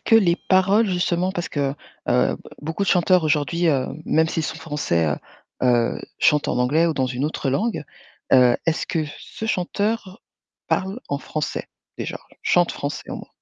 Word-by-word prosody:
que 225 - +2
les 180 -6 +5
paroles 195 +4 +4
justement 180 0 0
parce 175 -3 -3
que, 140 -2 -1 0.3
heu, - - +3 0.2
beaucoup 160 +6 -3
de - - -3
chanteurs 180 -1 +4
aujourd'hui, 155 +3 +1
heu, 135 -4 +2 0.2
même 160 0 +3
s'ils 160 - -1
sont 155 - -4
français, 145 - 0
heu 75 -1 0 0.5
heu, 120 -2 +2 0.2
chantent 150 -1 +3
en - - 0
anglais 150 +7 +3
ou 165 - +2
dans 130 -2 +1
une 125 +2 -2
autre 150 -2 -2
langue, 215 - 0 0.5
heu, 125 -2 +6
est-ce 165 - +1
que 160 -2 -1
ce 220 - -7
chanteur 205 +1 -1 0.5
parle 195 +6 -1
en 140 - 0
français, 155 +1 -4 0.3
déjà? - - -4 0.2
Chante 175 -1 +3
français, 145 +1 -5
au - - -4
moins? - - -10
160 Hz, 175 wpm, -23 LUFS, 145-185 Hz, 0.5 s, heu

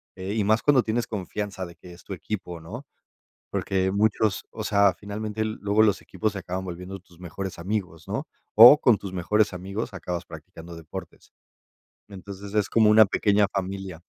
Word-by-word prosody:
eh, 95 +2 -5
y 105 - +1
más 110 +2 +3
cuando 140 -4 +4
tienes 115 +2 -1
confianza 100 -1 -4
de 85 -1 -12
que 90 +1 -13
es 85 - -16
tu - - -7
equipo, 90 -1 -5
¿no? 115 - -9 0.7
Porque 95 -1 0
muchos 105 0 +1
o 110 - -6
sea, 100 -2 +3
finalmente, 105 +1 -4
luego 110 0 +1
los 105 -2 +3
equipos 110 -2 -2
se - - -4
acaban 90 +1 -5
volviendo 90 +2 -7
tus 85 -1 -22
mejores 95 +2 -6
amigos, 90 -3 -4
¿no? - - -3 0.3
O 120 +7 +10
con 120 -8 +4
tus 95 -2 -7
mejores 105 +4 +1
amigos 100 +5 -5
acabas 90 -1 -4
practicando 85 +1 -11
deportes. 80 -2 -10 0.8
Entonces, 100 +1 -9
es 105 -2 +2
como 110 -2 +4
una 110 +1 +8
pequeña 100 0 +2
familia. 95 -3 -5
100 Hz, 175 wpm, -25 LUFS, 90-105 Hz, 0.8 s, O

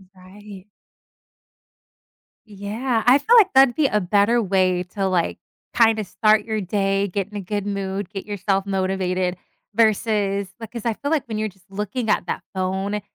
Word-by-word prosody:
Right. 190 +1 -13 1.8
Yeah, 215 +4 -2
I 250 +3 +7
feel 445 +12 +3
like 400 -4 +6
that'd 265 -2 +6
be 305 -3 +3
a 210 - +1
better 205 +5 +2
way 185 -3 +1
to, 195 -2 -1
like, 180 -3 0 0.4
kinda 225 -2 +4
start 215 +2 +2
your 220 -1 -2
day, 195 +1 0
get 195 0 -3
in 210 - -13
a - - -4
good 205 +1 -3
mood, 195 -1 -3
get 195 -2 -7
yourself 195 -1 -1
motivated, 185 -2 -1 0.4
versus, 205 -2 +1
like 225 -2 -9
'cause 235 -2 -7
I 230 - +1
feel 285 +7 -5
like 310 -6 0
when 220 -2 -4
you're 215 0 -1
just 190 0 -25
looking 210 +4 -4
at - - +1
that - - -3
phone, 190 +2 -2
205 Hz, 170 wpm, -22 LUFS, 190-220 Hz, 1.8 s, I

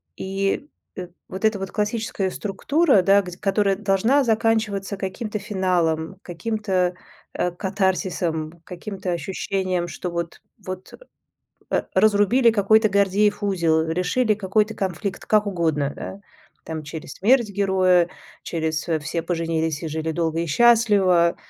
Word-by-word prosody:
И, 195 +7 -2 0.3
э, 180 -1 -6 0.2
вот, 190 +3 -3
э, 220 - +7
та 205 - -6
вот 195 0 -5
классическая 210 -3 -1
структура, 260 - +2
да, 200 +2 +5
гдь 180 -2 -9
которая 195 -1 +1
должна 210 +8 +2
заканчиваться 220 -4 0
каким-то 210 +3 -4
финалом, 185 -4 -1
каким-т, 185 -1 -1 0.4
э, 180 - -1
катарсисом, 185 -4 -1
каким-то 185 +1 -6
ощущением, 185 0 -2
что 180 - -5
вот 170 -1 -5 0.2
вот, 185 0 -7 0.8
э, - - +1
разрубили 215 +4 +4
какой-то 215 +1 +4
Гордеев 200 +1 +2
узел, 165 -5 +2
решили 185 +7 +1
какой-то 210 +2 0
конфликт 195 0 -3
как 215 -1 +2
угодно, 160 -7 0
да. 195 - -8 0.4
Там 160 -1 -5
через 150 -1 -8
смерть 235 +3 +3
героя, 185 -3 +3 0.3
через 160 -2 -2 0.2
"все 165 +3 -3
поженились 165 -2 -1
и - - -2
жили 160 +1 -3
долго 165 0 -1
и 170 - -2
счастливо". 190 -3 +4
190 Hz, 130 wpm, -23 LUFS, 170-210 Hz, 0.8 s, э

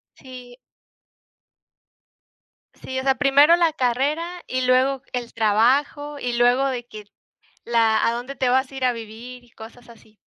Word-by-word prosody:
Sí. 250 -2 -13 2.2
Sí, 260 0 -6
o - - -5
sea, 270 0 +2
primero 285 +4 +5
la 335 -3 +1
carrera 300 +7 -2
y 255 0 -2
luego 255 +1 +2
el 240 -1 -5
trabajo 265 +7 +1
y 245 -2 -3
luego 245 +3 +3
de 245 -3 -4
que 215 -2 -11 0.6
la 225 -2 +2
a 230 - +1
dónde 245 +3 -6
te 255 -1 0
vas 260 +1 +1
a 270 - -14
ir 265 - -4
a 250 - +2
vivir 235 +2 -10
y 240 - -24
cosas 240 +2 -14
así. 220 -2 -19
250 Hz, 155 wpm, -22 LUFS, 235-275 Hz, 2.2 s, primero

